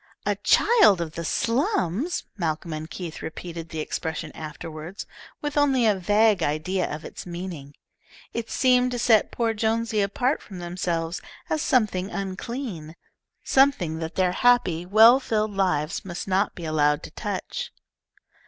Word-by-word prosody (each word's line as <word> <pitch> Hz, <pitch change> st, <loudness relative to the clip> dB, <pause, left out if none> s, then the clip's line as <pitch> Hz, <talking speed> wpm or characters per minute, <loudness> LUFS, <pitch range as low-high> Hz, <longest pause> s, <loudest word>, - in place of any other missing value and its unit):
"A -, -, +1 dB
child 425 Hz, -, +5 dB
of 165 Hz, -2 st, -3 dB
the 170 Hz, +1 st, -5 dB
slums!" 230 Hz, -, 0 dB
Malcolm 165 Hz, -3 st, -2 dB
and 155 Hz, +1 st, -6 dB
Keith 170 Hz, -3 st, -7 dB
repeated 165 Hz, 0 st, -7 dB
the 160 Hz, -1 st, -4 dB
expression 160 Hz, 0 st, -4 dB
afterward, 155 Hz, +3 st, -7 dB, 0.4 s
with 295 Hz, 0 st, -3 dB
only 270 Hz, -4 st, +3 dB
a 215 Hz, -, +5 dB
vague 205 Hz, +1 st, +3 dB
idea 165 Hz, +5 st, -1 dB
of 150 Hz, +2 st, -6 dB
its -, -, -8 dB
meaning. 170 Hz, -5 st, -7 dB, 0.6 s
It 235 Hz, -1 st, -4 dB
seemed 250 Hz, -1 st, +3 dB
to -, -, -2 dB
set 220 Hz, -2 st, +4 dB
poor 230 Hz, -2 st, 0 dB
Jonesy 225 Hz, 0 st, 0 dB
apart 245 Hz, +8 st, 0 dB
from 195 Hz, -, -10 dB
themselves 175 Hz, -1 st, -3 dB, 0.3 s
as 310 Hz, -, +1 dB
something 205 Hz, -9 st, +1 dB
unclean, 195 Hz, -, -5 dB, 0.5 s
something 265 Hz, -, +3 dB
that 160 Hz, 0 st, -5 dB
their 185 Hz, -1 st, +2 dB
happy, 180 Hz, -7 st, +2 dB
well 225 Hz, +6 st, +7 dB
filled 215 Hz, -5 st, -1 dB
lives 180 Hz, -4 st, 0 dB
must 175 Hz, -1 st, -6 dB
not 195 Hz, +2 st, +1 dB
be 175 Hz, -, -7 dB
allowed 150 Hz, -1 st, +2 dB
to -, -, -8 dB
touch. -, -, -4 dB
185 Hz, 145 wpm, -25 LUFS, 165-230 Hz, 0.6 s, well